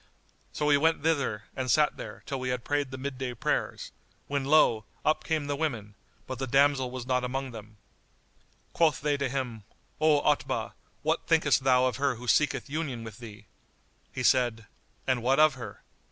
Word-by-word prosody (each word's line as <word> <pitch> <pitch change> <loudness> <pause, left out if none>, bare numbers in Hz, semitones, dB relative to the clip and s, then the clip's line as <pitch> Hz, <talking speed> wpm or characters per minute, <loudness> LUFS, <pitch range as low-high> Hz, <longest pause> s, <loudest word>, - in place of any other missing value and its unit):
So 150 - -2
we 145 -1 +5
went 160 0 +2
thither 140 -10 0
and 130 -1 -3
sat 150 +3 +3
there, - - -9
till 135 -2 -4
we 130 0 -3
had 125 -1 -2
prayed 145 -2 -1
the 130 - -7
midday 130 -2 -4
prayers, - - -2 0.3
when 140 -1 -2
lo! 135 -7 +4 0.2
up 155 - +2
came 155 -3 -1
the 145 0 -2
women; 120 -9 -3 0.3
but 130 -2 -6
the 135 - -2
damsel 135 0 +3
was 125 -1 -6
not 125 -1 0
among 135 +1 -3
them. 110 -2 -11 1.0
Quoth 160 -5 +3
they 145 0 +1
to 140 -2 -1
him, 125 -5 -4 0.4
"O 155 -1 +4
Otbah, 150 -1 0 0.3
what - - 0
thinkest 130 - +3
thou 130 -1 +4
of 125 -2 0
her 140 -1 +1
who 125 +2 -10
seeketh 150 +4 +2
union 140 -5 -3
with 110 0 -9
thee?" 105 -3 -11 0.7
He 130 - -4
said, 120 -4 +2 0.4
"And 130 -2 +1
what 130 +4 +2
of 155 -1 +6
her?" 125 -2 -9
130 Hz, 180 wpm, -28 LUFS, 125-145 Hz, 1.0 s, of